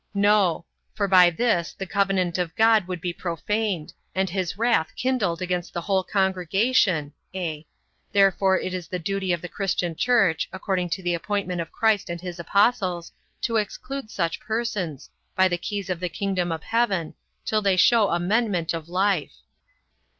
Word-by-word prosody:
No; 200 -4 +3 0.3
for 200 -2 0
by 180 -2 +7
this, 175 -2 0
the 195 - -6
covenant 190 -3 0
of 175 -2 -2
God 220 -4 +4
would 180 -2 -5
be 175 0 -2
profaned, 185 +1 -2 0.2
and 190 -1 0
his 185 -1 -2
wrath 225 -8 +2
kindled 210 -10 0
against 180 -1 -3
the 175 - -1
whole 190 +1 +1
congregation; 190 - +1 0.2
(a) 160 -4 -4 0.4
therefore 195 -1 +4
it 185 - -4
is 180 -3 -5
the 180 - -3
duty 190 +2 -2
of 175 -1 -1
the - - -4
christian 180 -3 -2
church, 195 -8 +2
according 190 -2 -2
to 175 +2 -3
the 175 0 0
appointment 180 0 -2
of 165 - -7
Christ 220 -4 +1
and 170 0 -4
his 180 -1 -7
apostles, 185 -2 +1 0.3
to 230 -2 +1
exclude 220 +4 -4
such 170 -6 -2
persons, 220 - -3 0.2
by 190 0 +5
the 175 -1 -2
keys 200 +1 -4
of 185 -3 -2
the 180 0 -2
kingdom 180 0 -1
of 160 -2 -4
heaven, 200 -9 0 0.3
till 215 -1 +1
they 195 -2 +2
show 220 +1 +5
amendment 180 -1 0
of 165 0 -6
life. 185 -3 0
185 Hz, 165 wpm, -24 LUFS, 175-205 Hz, 0.4 s, by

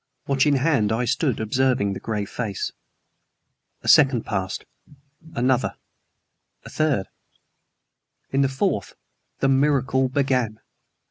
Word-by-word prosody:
Watch 135 0 +2
in 145 - +4
hand, 130 -7 +2
I 115 +3 0
stood 135 0 0
observing 110 -2 +1
the - - -6
gray 105 -2 -3
face. 100 -2 -4 1.1
A - - -8
second 135 -7 +5
passed; 95 0 -3 0.7
another; 125 +1 +1 0.9
a - - -10
third. 145 -11 +1 1.3
In 135 - +2
the 135 - +2
fourth 135 - -1 0.5
the 135 - +3
miracle 135 -1 +2
began. 130 -5 0
130 Hz, 115 wpm, -23 LUFS, 110-135 Hz, 1.3 s, second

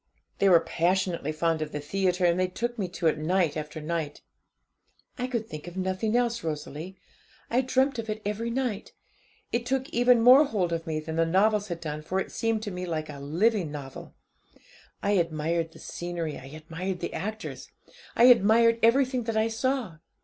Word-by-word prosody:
They 200 - +4
were 175 -2 +7
passionately 170 -1 0
fond 160 0 0
of 155 -1 -3
the 150 - -4
theatre, 180 +4 0
and 175 +1 +3
they 185 - +2
took 240 +6 -4
me 190 - -1
to 175 -1 -6
it 155 -1 +3
night 170 0 +1
after 155 0 -5
night. 155 -1 -3 1.0
'I 250 - -1
could 235 -3 -3
think 155 -2 -8
of 175 +1 -8
nothing 190 +4 -1
else, 235 -1 +1
Rosalie. 155 +3 -5 0.5
I 245 +2 +3
dreamt 260 0 +1
of 225 -1 -5
it 215 0 -2
every 210 +3 -2
night. 235 -4 -3 0.6
It 235 - 0
took 260 +2 -1
even 245 -4 +4
more 255 +5 +9
hold 190 -10 -1
of 165 0 -3
me 155 -1 -1
than 160 +1 -5
the 165 - +3
novels 205 +4 +2
had 170 -3 -5
done 150 -1 -4
for 185 +5 -2
it - - -4
seemed 225 -1 -1
to 205 - -4
me 180 0 -5
like 155 -2 -3
a 145 -2 -8
living 170 +4 +1
novel. 140 -3 -8 0.9
I 200 - +1
admired 165 -2 0
the - - -15
scenery, 170 -3 -5
I - - -10
admired 165 +5 -5
the - - -4
actors, 215 +2 -5 0.5
I - - +4
admired 230 -1 +6
everything 255 +1 +3
that 225 -1 -1
I 220 +1 +2
saw. 230 - -1
185 Hz, 190 wpm, -27 LUFS, 165-230 Hz, 1.0 s, more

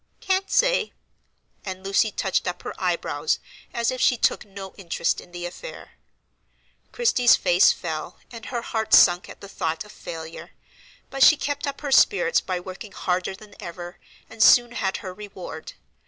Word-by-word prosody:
"Can't 385 0 0
say," - - +2 0.7
and 190 -1 -6
Lucy 195 +3 +2
touched - - -1
up - - -4
her - - -5
eyebrows - - 0 0.3
as 235 +1 0
if 255 - -4
she 250 - +4
took - - +1
no 195 -2 -10
interest 170 -4 -2
in 175 - -17
the 175 0 -6
affair. - - -9 1.0
Christie's 260 - +4
face 175 +1 +4
fell, 160 -3 -5
and 230 -2 -9
her 240 -2 -3
heart 220 -2 +2
sunk 175 0 +5
at - - -12
the 200 - -9
thought 160 -3 -3
of 210 - -14
failure; 165 -3 -9 0.6
but 270 - -5
she 310 - +8
kept 285 0 -3
up 280 - -5
her 285 -2 -4
spirits 475 - +4
by 185 -1 -3
working 185 +4 -9
harder 185 +1 -2
than 205 +1 -15
ever, 175 +1 -8 0.3
and 225 0 -9
soon 240 -1 +7
had 195 -5 -2
her 185 - -5
reward. 185 -5 -9
200 Hz, 170 wpm, -24 LUFS, 180-250 Hz, 1.0 s, she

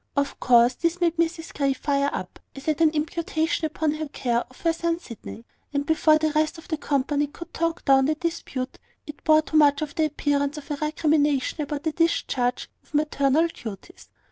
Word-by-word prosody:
Of 280 0 0
course, 240 0 +5
this 335 +6 -1
made 340 -1 +1
Mrs 335 0 -1
Grey 275 -1 +1
fire 280 +1 0
up, - - -6 0.2
as 275 +2 -10
at 310 +1 +1
an 320 - +6
imputation 315 +1 -1
upon 310 0 -1
her 310 0 -4
care 240 -4 0
of 255 - -18
her 330 -1 +2
son 335 0 -1
Sydney; 230 -5 -10 0.3
and 285 0 0
before 310 0 +4
the 310 0 0
rest 310 +2 +1
of 325 - -13
the 330 - -1
company 290 0 0
could 340 +4 -11
talk 335 +1 -2
down 270 -1 +5
the 310 +2 +1
dispute, 305 -6 -4 0.3
it 295 - -10
bore 310 0 +5
too 310 - 0
much 290 -1 +5
of 300 - -6
the 315 - +1
appearance 290 -1 0
of 300 0 -8
a 290 - -1
recrimination 300 -1 +1
about 290 0 -4
the 320 - 0
discharge 270 -6 0
of - - -12
maternal 295 0 +2
duties. 220 - -10
300 Hz, 195 wpm, -25 LUFS, 280-320 Hz, 0.3 s, an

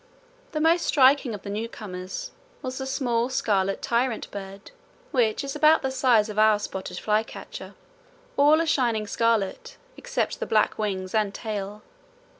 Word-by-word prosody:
The 305 - -1
most 330 +2 +3
striking 265 -4 +4
of 200 - -11
the 200 - -6
newcomers 210 - -6 0.3
was 255 0 -4
the 265 - -4
small 245 -3 0
scarlet 195 -6 0
tyrant 235 -1 -1
bird, 195 0 -9 0.4
which 235 -3 +1
is 275 +1 -5
about 310 +1 +5
the 265 - -1
size 250 -5 +3
of 210 -1 -3
our 215 -1 +5
spotted 190 -2 -6
flycatcher; 215 +1 -3 0.6
all 300 +3 +5
a - - 0
shining 240 -9 +1
scarlet 220 -2 -1 0.2
except - - -2
the - - -3
black 215 0 +2
wings 190 -3 -2
and 210 -2 +1
tail. 210 -2 -5
225 Hz, 150 wpm, -25 LUFS, 205-265 Hz, 0.6 s, about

